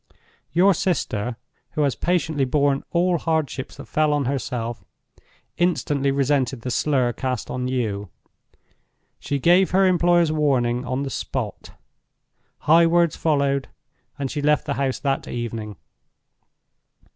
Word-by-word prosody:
Your 185 +6 +5
sister—who 130 - -3
has 140 -3 +2
patiently 160 -5 0
borne 140 +1 +1
all 175 0 +1
hardships 155 -5 -2
that - - -9
fell 155 -1 +1
on 145 -2 0
herself—instantly 135 +4 -3
resented 135 -3 +1
the 125 - -4
slur 130 -3 +1
cast 130 -1 -3
on 125 0 -2
you. 105 -6 -2 1.1
She 140 - -2
gave 175 +6 +4
her 190 +2 +3
employers 175 -2 +3
warning 130 -5 +1
on 130 +2 -2
the 135 - -4
spot. - - -5 0.9
High 165 +2 +5
words 170 -1 +3
followed, 140 -3 +1 0.5
and 135 -2 -3
she 145 - -3
left 150 +1 +2
the 140 - -1
house 135 -2 -1
that 135 -1 -2
evening. 115 -3 -5
140 Hz, 120 wpm, -23 LUFS, 125-160 Hz, 1.1 s, Your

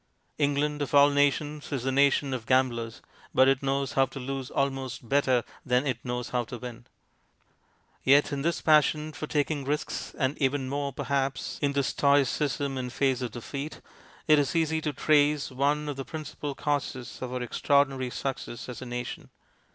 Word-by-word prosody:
England, 145 +1 +1
of 145 0 -1
all 145 0 +7
nations, 145 +1 +1
is 135 -4 -2
the 135 - 0
nation 140 0 +3
of 120 -3 -5
gamblers, 120 -3 +1 0.3
but 130 - +6
it 135 -1 +3
knows 135 0 -1
how 135 0 +3
to 135 - -8
lose 135 +1 -4
almost 135 -3 -2
better 130 -2 +3 0.2
than 125 +2 +2
it 125 -5 -1
knows 125 -1 -3
how 125 -1 0
to 120 +2 -7
win. 120 -1 -9 1.2
Yet 140 +3 +5
in 140 - -2
this 170 +3 0
passion 155 0 +3
for 155 - -5
taking 145 -1 0
risks, 150 +3 -3
and 135 0 0
even 135 -1 +1
more 140 +1 -2
perhaps 135 -1 -2
in 140 -1 +1
this 140 -4 +1
stoicism 140 -1 +1
in 125 -1 -3
face 130 0 0
of 125 - -2
defeat, 140 +6 -6 0.5
it 155 -1 +6
is 140 +2 0
easy 160 -1 +1
to 150 - -1
trace 145 0 +2
one 145 +3 0
of 145 -2 -4
the 135 - -3
principal 150 -2 -6
causes 140 -4 -3
of 130 -1 -4
our 125 -1 -2
extraordinary 135 +1 +1
success 125 -2 -5
as 125 0 -7
a 130 - -6
nation. 120 0 -5
140 Hz, 175 wpm, -28 LUFS, 130-145 Hz, 1.2 s, all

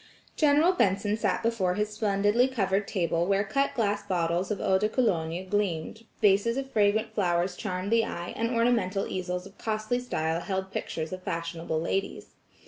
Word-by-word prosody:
General 305 +3 +4
Benson 205 - +1
sat 225 - -1
before 205 -6 +1
his 210 +1 0
splendidly 210 +3 +2
covered 200 -5 0
table 170 -3 0
where 200 0 +2
cut 275 +7 0
glass 205 -4 0
bottles 175 0 -1
of 210 - -2
eau 190 0 +2
de 215 - +1
cologne 180 -8 0
gleamed, 205 +1 -2
vases 210 +4 +3
of 270 0 -4
fragrant 215 +1 +2
flowers 180 -2 +1
charmed 185 0 -4
the 230 0 +4
eye, 175 -4 -5
and 230 +1 -1
ornamental 230 -5 +1
easels 180 -1 -3
of 195 - -15
costly 215 +2 -1
style 160 -9 -1
held 190 +1 -3
pictures 160 +2 -4
of 185 - -6
fashionable 165 -2 -3
ladies. 195 +4 -3
200 Hz, 165 wpm, -28 LUFS, 180-225 Hz, -, General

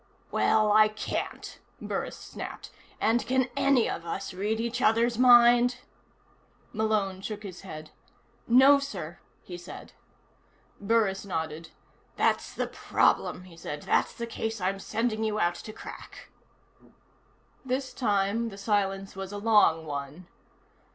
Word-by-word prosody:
"Well, 215 -1 +3
I 215 +1 +6
can't," 215 0 -5 0.2
Burris - - -4
snapped. - - -8 0.3
"And 230 +2 +2
can 260 0 +1
any 275 -4 +3
of 165 - -4
us 180 +3 -5
read 210 +4 -2
each 235 +2 -2
other's 230 +1 +2
mind?" 245 0 +6 1.0
Malone 210 -4 0
shook 210 +1 -6
his 185 -3 -8
head. 155 -5 -9 0.6
"No, 265 +4 +7
sir," 185 - -6 0.2
he 175 -1 -8
said. 175 - -11 0.9
Burris 205 -2 +1
nodded. 160 -4 -4 0.5
"That's - - +1
the - - -1
problem," 180 - 0
he 180 -2 -14
said. 150 -3 -7
"That's - - +1
the 235 - -4
case 225 -1 -4
I'm 195 +1 -1
sending 220 +2 -2
you 215 -1 -1
out 175 -2 +2
to 215 - -8
crack." - - -11 1.3
This 260 0 -3
time, 210 0 0
the 195 - -11
silence 195 -2 -1
was 195 0 -6
a 205 - -5
long 205 -7 +4
one. 145 +4 -6
210 Hz, 130 wpm, -28 LUFS, 190-235 Hz, 1.3 s, No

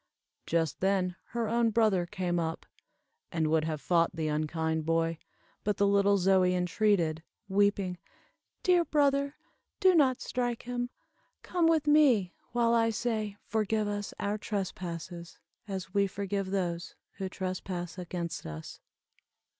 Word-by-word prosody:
Just 165 -3 0
then 190 -2 +1
her 235 -1 -2
own 230 +1 +2
brother 210 -6 +2
came 180 -3 -1
up, 165 -1 -3 0.7
and 165 -2 0
would 160 -1 +3
have 155 -2 -2
fought 170 +1 +2
the 160 -1 -1
unkind 160 +1 -1
boy, 165 0 0 0.4
but 210 -1 0
the 200 - +3
little 200 0 +4
Zoie 185 -1 +4
entreated, 180 -3 +1 0.3
weeping, 195 -2 +1 0.6
"Dear 360 -2 +4
brother, 280 -2 +2 0.4
do 375 -2 +6
not 270 -6 +4
strike 245 -2 -2
him. 245 0 -3 0.5
Come 345 -2 +2
with 320 -2 +3
me, 270 -12 +4 0.2
while 235 -1 +2
I 230 -1 +4
say, 220 -2 -2
'Forgive 215 -1 0
us 205 0 -3
our 205 +1 -1
trespasses, 175 -4 -5 0.3
as 190 -1 -5
we 200 -1 +3
forgive 195 0 -3
those 175 -3 -2 0.2
who 190 -1 -2
trespass 185 -1 -4
against 175 - -4
us. 80 0 -8
195 Hz, 135 wpm, -30 LUFS, 175-225 Hz, 0.7 s, do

